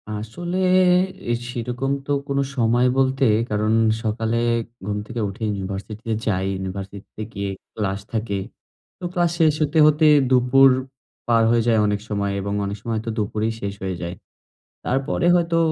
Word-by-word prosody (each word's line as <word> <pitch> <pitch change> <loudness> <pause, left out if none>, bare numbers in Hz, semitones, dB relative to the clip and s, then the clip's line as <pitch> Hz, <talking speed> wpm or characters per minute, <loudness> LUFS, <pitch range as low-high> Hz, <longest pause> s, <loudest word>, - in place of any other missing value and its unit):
আসলে 175 - -5 0.7
এ - - +2 0.2
সেরকম 125 +2 -3
তো 145 - -3 0.2
কোন 140 0 0 0.2
সময় 120 0 +3
বলতে 135 0 +2 0.3
কারণ, 105 +1 +1 0.3
সকালে 110 +1 -1 0.5
ঘুম 105 0 -2
থেকে 115 - -5
উঠে 100 - -11
ইউনিভার্সিটিতে 100 +3 -4
যাই। 95 -3 0
ইউনিভার্সিটিতে 95 +2 -7
গিয়ে 100 0 -3 0.3
ক্লাস 100 -2 -2
থাকে। 110 -3 -1 0.6
তো - - -14
ক্লাস 175 -2 +2
শেষ 155 -2 +5
হতে, 155 +1 +2
হতে, 155 +1 +3 0.2
দুপুর 130 +1 +6 0.6
পার 115 -1 +4
হয়ে 120 -1 +3
যায় 115 -2 +4
অনেক 105 0 0
সময়। 100 -1 -1
এবং 100 +1 -3
অনেক 100 +1 -4
সময় 115 -1 -3
হয়তো 115 +1 -3
দুপুরেই 110 +1 -1
শেষ 100 0 -3
হয়ে 95 -1 -2
যায়। 85 +1 -4 0.7
তারপরে 135 +6 0
হয়তো 170 -1 +1
115 Hz, 150 wpm, -22 LUFS, 100-130 Hz, 0.7 s, দুপুর